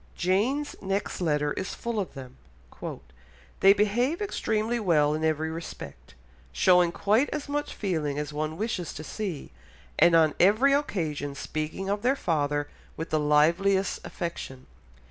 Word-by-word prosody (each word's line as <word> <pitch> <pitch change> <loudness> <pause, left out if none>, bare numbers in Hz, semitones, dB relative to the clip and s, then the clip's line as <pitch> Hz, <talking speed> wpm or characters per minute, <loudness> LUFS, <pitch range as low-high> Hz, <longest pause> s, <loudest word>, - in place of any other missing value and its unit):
Jane's 225 +11 0
next 195 0 -2
letter 150 -3 +1
is 190 - -4
full 235 -2 -3
of 190 - -4
them. 130 -1 -10 1.2
"They 195 - +7
behave 225 - +2
extremely 235 - -1
well 155 -7 +3
in 155 +1 -2
every 160 0 0
respect, 165 - -9 0.4
showing 180 - +4
quite 215 +10 +2
as 300 -1 -4
much 290 +1 -3
feeling 155 -8 -2
as 150 0 -4
one 155 +1 -3
wishes 205 -6 -3
to 155 - -6
see, 180 - -5 0.5
and 170 - +6
on 160 -2 +5
every 215 +10 +5
occasion 160 - -1
speaking 155 +6 -4
of 205 +1 -1
their 255 +4 +2
father 145 - 0 0.3
with 160 - -5
the 155 - +2
liveliest 170 +7 +3
affection. 135 -7 -6
175 Hz, 145 wpm, -27 LUFS, 150-210 Hz, 1.2 s, They